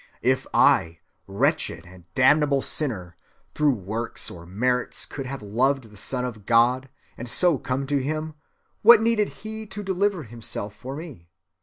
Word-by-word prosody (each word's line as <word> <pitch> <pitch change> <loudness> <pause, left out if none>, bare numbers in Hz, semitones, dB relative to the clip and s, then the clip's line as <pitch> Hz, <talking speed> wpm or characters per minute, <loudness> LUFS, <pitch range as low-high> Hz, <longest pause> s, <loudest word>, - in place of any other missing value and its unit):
If 130 +2 +1
I, 85 0 +4 0.3
wretched 100 +1 0
and 90 -1 -16
damnable 140 +1 +4
sinner, 90 - -2 0.4
through 150 -3 +2
works 110 +3 -3
or 85 -1 -11
merits 125 +7 -1
could 135 -2 -6
have 135 -3 -6
loved 125 +3 0
the - - -15
Son 125 +5 -2
of 110 -5 -7
God, 125 +3 +3 0.3
and 120 +1 -6
so 170 0 +3
come 135 +2 -2
to 140 0 0
him, 155 +3 -3 0.5
what 230 +1 +9
needed 225 -2 +2
he 220 0 -8
to 205 +1 -7
deliver 195 -2 0
himself 110 -3 -5
for 130 +4 -7
me? 145 - -10
130 Hz, 155 wpm, -24 LUFS, 110-155 Hz, 0.5 s, what